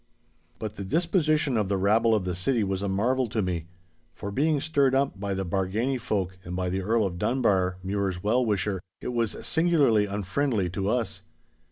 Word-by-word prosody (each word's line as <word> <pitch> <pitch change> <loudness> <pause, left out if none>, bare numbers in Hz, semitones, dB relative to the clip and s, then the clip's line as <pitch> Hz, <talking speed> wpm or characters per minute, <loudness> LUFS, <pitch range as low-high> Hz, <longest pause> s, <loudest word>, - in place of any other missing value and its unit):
But 110 +1 -6
the 100 - -4
disposition 155 - +1
of 105 -3 0
the 100 - +1
rabble 110 +4 +3
of 100 -4 -1
the 90 - -1
city 110 +6 +1
was 95 -1 -2
a 100 - -1
marvel 120 +6 +1
to 110 0 -2
me. 90 -4 -2 0.5
For 100 - -6
being 150 +6 +2
stirred 140 -3 +2
up 135 -7 0
by 100 -1 -2
the 95 0 -2
Bargany 100 +9 -1
folk 95 -5 -2
and 90 - -6
by 90 0 -1
the 95 +1 -1
Earl 110 +3 +2
of 90 -2 -4
Dunbar, 95 -8 +1
Mure's 95 -2 -2
well 120 +5 +2
wisher, 100 -4 0 0.2
it - - -5
was 115 -3 -1
singularly 150 -11 +3
unfriendly 100 0 -1
to 95 +3 -2
us. 105 -5 -1
105 Hz, 190 wpm, -27 LUFS, 95-125 Hz, 0.5 s, rabble